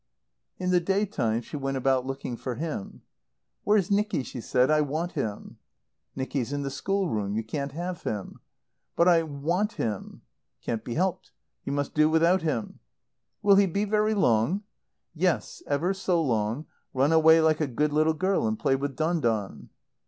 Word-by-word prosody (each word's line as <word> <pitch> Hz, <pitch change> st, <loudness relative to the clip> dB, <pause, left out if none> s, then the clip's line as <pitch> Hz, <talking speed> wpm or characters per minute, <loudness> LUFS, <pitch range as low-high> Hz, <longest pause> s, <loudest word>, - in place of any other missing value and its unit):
In 180 Hz, 0 st, -1 dB
the 180 Hz, -, +5 dB
day 195 Hz, +4 st, +1 dB
time 115 Hz, -, -1 dB
she 150 Hz, -, -9 dB
went 135 Hz, -1 st, -2 dB
about 130 Hz, 0 st, +1 dB
looking 135 Hz, -2 st, -4 dB
for 125 Hz, +1 st, -5 dB
him. 155 Hz, -9 st, -5 dB, 0.6 s
"Where's 205 Hz, -3 st, +2 dB
Nicky?" 205 Hz, -8 st, +1 dB
she 125 Hz, -1 st, -7 dB
said. 125 Hz, +4 st, +2 dB
"I 155 Hz, 0 st, +4 dB
want 155 Hz, +4 st, -2 dB
him." 105 Hz, -2 st, -4 dB, 0.6 s
"Nicky's 130 Hz, -1 st, -2 dB
in 145 Hz, 0 st, -2 dB
the 135 Hz, -, -3 dB
schoolroom. 140 Hz, -, -1 dB
You 110 Hz, -, -1 dB
can't 140 Hz, +5 st, -4 dB
have 175 Hz, +2 st, -4 dB
him." 105 Hz, -3 st, -5 dB, 0.5 s
"But 170 Hz, -, +4 dB
I 170 Hz, -2 st, +6 dB
want 165 Hz, +8 st, -1 dB
him." 105 Hz, -4 st, -4 dB, 0.4 s
"Can't 110 Hz, -2 st, -3 dB
be 120 Hz, -, -5 dB
helped. 185 Hz, +1 st, -1 dB, 0.4 s
You -, -, -3 dB
must 145 Hz, -1 st, -2 dB
do 155 Hz, 0 st, +4 dB
without 165 Hz, +3 st, +3 dB
him." 150 Hz, -9 st, -3 dB, 0.6 s
"Will 200 Hz, -1 st, +6 dB
he 200 Hz, -1 st, +5 dB
be 200 Hz, +4 st, -1 dB
very 215 Hz, +1 st, +1 dB
long?" 165 Hz, -, +2 dB, 0.5 s
"Yes, -, -, -1 dB
ever 170 Hz, +7 st, +1 dB
so 190 Hz, -2 st, 0 dB
long. 120 Hz, -1 st, 0 dB, 0.3 s
Run 135 Hz, +4 st, +3 dB
away 160 Hz, 0 st, +6 dB
like 160 Hz, -1 st, +3 dB
a 155 Hz, -, +1 dB
good 145 Hz, +4 st, 0 dB
little 155 Hz, +1 st, +3 dB
girl 185 Hz, -, +1 dB
and 110 Hz, 0 st, -1 dB
play 135 Hz, -, +2 dB
with 140 Hz, 0 st, -3 dB
Don 165 Hz, +2 st, 0 dB
Don." 110 Hz, -7 st, -2 dB
155 Hz, 175 wpm, -27 LUFS, 130-180 Hz, 0.6 s, I